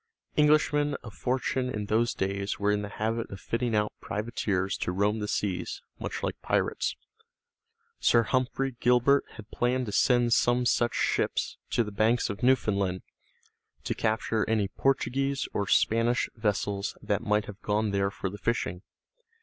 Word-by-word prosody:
Englishmen 150 -1 +3
of 110 - -9
fortune 125 +4 -1
in 105 -4 -3
those 115 +3 +1
days 100 +1 -2
were 100 0 +1
in 105 0 +1
the 105 - -5
habit 115 +2 -2
of 95 - -8
fitting 115 +1 -1
out 105 0 +1
privateers 100 -3 -1
to - - -2
roam 100 +4 +1
the 105 - -3
seas, 95 -4 -2 0.2
much - - -5
like - - -3
pirates. - - 0 1.0
Sir 115 - +4
Humphrey 130 +2 -1
Gilbert 125 +3 +4
had 110 -1 -12
planned 125 +1 0
to 105 - -5
send 120 +1 +3
some 120 +1 +3
such 120 0 +2
ships - - 0
to 120 - +2
the 105 - -6
banks 110 +3 +2
of 100 - -8
Newfoundland 100 -7 +2 0.8
to - - -1
capture 110 0 0
any 105 -3 +1
Portuguese 135 +1 0
or 100 - -1
Spanish 115 +5 +2
vessels 105 -2 -1
that 100 - 0
might 105 0 +1
have 105 0 -10
gone 105 0 0
there 100 0 +1
for 95 -1 -4
the 100 - -9
fishing. 105 -6 -1
110 Hz, 160 wpm, -28 LUFS, 100-125 Hz, 1.0 s, Sir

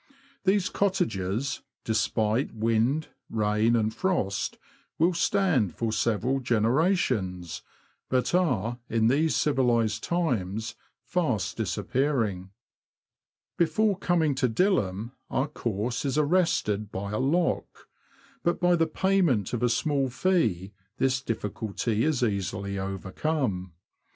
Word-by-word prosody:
These 195 0 +3
cottages, 140 - -1 0.2
despite 110 +2 0
wind, 115 +7 +1 0.2
rain, 110 +1 +2
and 110 -1 +1
frost, 170 - -1 0.4
will 170 +3 +3
stand 165 - +1
for 115 -1 -1
several 120 +5 +1
generations, 115 - 0 0.5
but 130 +4 +1
are, 120 - +1
in 110 0 +3
these 155 +5 +2
civilised 120 -6 +1
times, 115 - -1 0.3
fast 135 - -1
disappearing. 115 -9 -1 1.1
Before 205 +4 +3
coming 170 -5 +1
to 125 - +3
Dilham 115 - +1 0.2
our 135 - 0
course 120 -4 -3
is 140 0 -1
arrested 145 - +1
by 100 +1 -4
a 105 - -1
lock, 165 +7 0 0.5
but 170 0 0
by 175 -1 +4
the 165 -1 +2
payment 165 - +1
of 120 - -1
a 120 - +3
small 135 +3 +1
fee 115 - 0 0.2
this 135 0 +1
diffi 110 -5 -3
culty 105 +1 -2
is 145 -3 +1
easily 100 -2 -2
overcome. 95 - -2
120 Hz, 110 wpm, -27 LUFS, 105-160 Hz, 1.1 s, by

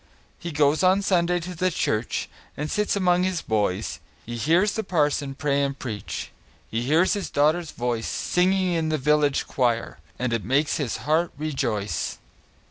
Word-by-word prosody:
He 175 - -5
goes 150 0 +3
on 190 +2 +4
Sunday 175 -2 +2
to 180 +2 -6
the 185 +2 +1
church, 115 -9 -1 0.3
And 150 +1 -3
sits 210 0 +1
among 180 -2 +3
his 185 -2 -1
boys; 105 -3 -1 0.3
He 120 - -5
hears 170 - +3
the 220 - -2
parson 150 -6 0
pray 140 0 +1
and 140 0 -1
preach, 110 -6 -5 0.4
He 115 - -1
hears 155 +9 +3
his 200 -2 -3
daughter's 155 +3 +2
voice, 120 -2 -2
Singing 185 0 +1
in 160 -2 0
the 155 - +1
village 150 0 +2
choir, 120 -7 -1 0.2
And 125 -1 -1
it 115 -3 -1
makes 140 +8 +1
his 140 -7 -2
heart 160 +3 +2
rejoice. 130 -9 -2
150 Hz, 165 wpm, -25 LUFS, 125-175 Hz, 0.4 s, on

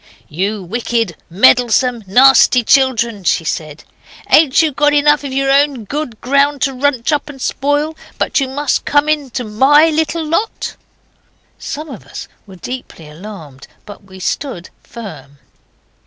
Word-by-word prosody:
'You 195 +5 -3
wicked, 225 -1 -2
meddlesome, 240 +4 +3
nasty 255 +3 +5
children!' 235 -5 +2
she 170 - +1
said, 155 -1 -5 0.5
ain't 300 -4 +5
you 315 - +1
got 295 +2 +2
enough 295 0 +3
of 280 - -5
your 270 +1 0
own 280 -3 +2
good 250 0 -5
ground 280 +2 +1
to 275 - +1
runch 265 0 0
up 295 0 -1
and 275 -2 -10
spoil, 290 +4 -1 0.2
but - - 0
you 270 - -1
must 285 +2 -1
come 290 +1 +1
into 285 -5 -2
MY 275 +9 +4
little 320 +1 -1
lot?' 335 +8 -2 0.8
Some 305 +3 -6
of 260 -9 -10
us - - -8 0.2
were 190 - -13
deeply 185 -5 -8
alarmed, 155 -4 -11 0.2
but 205 -1 -12
we 190 -1 -14
stood 185 -2 -4
firm. 150 - -11
260 Hz, 145 wpm, -15 LUFS, 210-290 Hz, 0.8 s, nasty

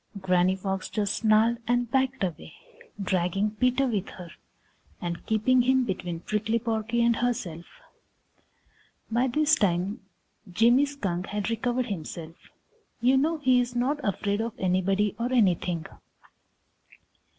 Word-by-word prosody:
Granny 185 0 +2
Fox 190 0 -4
just 205 -2 -1
snarled 225 +1 +3
and 245 -1 0
backed 265 -3 +1
away, 170 -3 -5 0.4
dragging 195 +1 0
Peter 250 +5 +1
with 210 -6 -2
her 175 -3 -10 0.7
and 170 -1 -4
keeping 235 +4 +3
him 260 +1 +3
between 180 -5 -4
Prickly 215 +3 -1
Porky 230 +1 -1
and 235 -1 +3
herself. 205 -9 -2 1.5
By 240 +3 +2
this 300 +4 +2
time 195 - +1 0.5
Jimmy 240 +8 +4
Skunk 195 -11 -3
had 210 +2 -3
recovered 245 +2 -1
himself. 165 -5 -6 0.6
You 250 +3 +3
know 310 +5 +2
he 260 -4 +3
is 245 0 -4
not 265 +5 0
afraid 205 0 -1
of 230 0 -3
anybody 190 +2 +1
or 240 +2 -1
anything. 180 -8 +1
220 Hz, 130 wpm, -27 LUFS, 190-245 Hz, 1.5 s, Jimmy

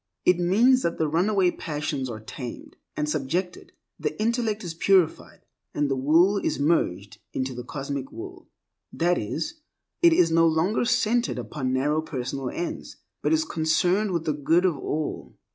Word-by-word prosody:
It 180 -1 +4
means 230 +9 +4
that 170 - -1
the 160 - +1
runaway 180 +4 +2
passions 150 -6 -3
are 110 -2 -6
tamed 120 +2 -8 0.2
and 150 - 0
subjected, 155 +5 -2 0.3
the - - -3
intellect 225 -1 0
is 170 -2 -5
purified, 185 0 +1 0.3
and 145 -1 0
the - - +2
will 165 +9 +4
is - - -1
merged 105 - 0
into 130 0 -2
the 125 0 -6
Cosmic 135 0 -5
Will. 115 - -10 0.4
That 175 +1 +1
is, 160 - -4 0.4
it 340 -1 +7
is 175 - +4
no 165 0 +5
longer 165 +9 +1
centered 240 -1 +1
upon 130 -5 -3
narrow 145 +4 +1
personal 130 -3 -4
ends, 175 - -5 0.2
but - - 0
is 315 0 +2
concerned 175 - +1
with 170 -3 -2
the 155 - +1
good 160 +5 +2
of 180 -4 +2
all. 150 +2 -4
160 Hz, 160 wpm, -25 LUFS, 140-190 Hz, 0.4 s, it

